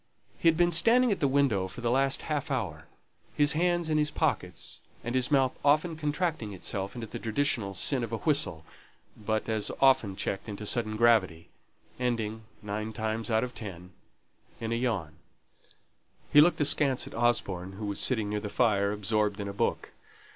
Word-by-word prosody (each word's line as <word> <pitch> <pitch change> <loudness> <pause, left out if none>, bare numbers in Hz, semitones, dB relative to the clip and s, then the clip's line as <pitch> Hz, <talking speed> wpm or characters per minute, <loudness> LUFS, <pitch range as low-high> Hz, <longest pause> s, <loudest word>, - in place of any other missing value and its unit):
He - - +1
had 165 -1 +5
been 175 0 +3
standing 230 +9 +4
at 200 - 0
the 140 - +2
window 130 -9 +2
for 105 +6 -9
the 120 -1 0
last 135 +1 +2
half 150 -2 -2
hour, 90 - -3 0.5
his 145 0 +3
hands 175 +1 +1
in 155 -1 +1
his 150 0 +2
pockets, 145 - -2 0.2
and 120 - -4
his 130 -1 +1
mouth 135 -3 +3
often 155 +4 +3
contracting 150 - -2
itself 95 +1 -4
into 120 -2 -5
the - - -7
traditional 115 -4 -1
sin 130 +5 +1
of 115 - -5
a 115 - -1
whistle, 140 - 0 0.5
but 110 0 -2
as 110 -2 0
often 130 -8 +4
checked 95 +3 -3
into 105 +1 -6
sudden 110 -1 0
gravity 105 -8 +2 0.5
ending, 110 -3 -2 0.2
nine 105 +2 -4
times 110 0 -2
out 110 0 +2
of 125 - -5
ten, 90 -4 -8 0.7
in 115 0 -4
a - - +1
yawn. 100 -11 -2 1.2
He 145 - +9
looked 175 +3 +3
askance 140 -2 +3
at - - -10
Osborne, 100 -6 0
who 105 +2 -6
was 100 -1 -3
sitting 110 -5 0
near 105 - -1
the 105 0 -5
fire 100 -1 +2
absorbed 105 0 0
in 100 - -4
a 100 - -5
book. - - -2
115 Hz, 180 wpm, -29 LUFS, 105-140 Hz, 1.2 s, He